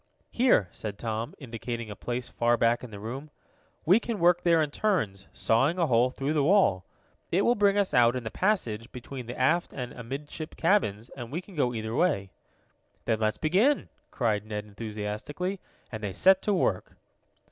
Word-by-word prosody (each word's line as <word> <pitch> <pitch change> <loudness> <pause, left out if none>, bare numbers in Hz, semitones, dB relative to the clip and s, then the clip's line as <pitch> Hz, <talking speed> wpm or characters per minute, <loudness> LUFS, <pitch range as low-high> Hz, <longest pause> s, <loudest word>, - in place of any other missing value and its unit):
"Here," 235 - +3
said 105 -2 -6
Tom, 115 +1 -4
indicating 115 -3 -6
a - - -6
place 120 +2 -4
far 120 0 +1
back 115 +1 +2
in 125 - -7
the 105 -2 -9
room. 130 +8 -6 0.6
"We 185 +7 +6
can 235 -2 -4
work 175 -1 +4
there 170 -2 +4
in 150 - -3
turns, 145 - -1
sawing 135 +10 +2
a 175 - +3
hole 125 -2 +3
through 135 +3 -2
the 150 -2 +2
wall. 145 - +3 0.5
It 190 +4 +3
will 240 - +4
bring 205 -3 +3
us 200 -2 +1
out 120 0 +5
in 125 - -3
the 110 - -5
passage 120 - -1
between 125 0 -8
the 120 - -6
aft 160 +7 +2
and 125 -2 -5
amidship 140 +6 -7
cabins, 120 - +1
and 120 -2 -9
we 160 - -2
can 190 +2 -13
go 140 -7 +1
either 110 0 -4
way." 100 - +1 0.7
"Then 110 - +1
let's 110 -1 0
begin!" 205 - +2 0.2
cried 110 -5 0
Ned 105 -1 -5
enthusiastically, 110 - -5 0.3
and 110 -2 -6
they 100 -3 -3
set 190 - +5
to 210 - 0
work. 100 - -1
125 Hz, 185 wpm, -28 LUFS, 110-175 Hz, 0.7 s, We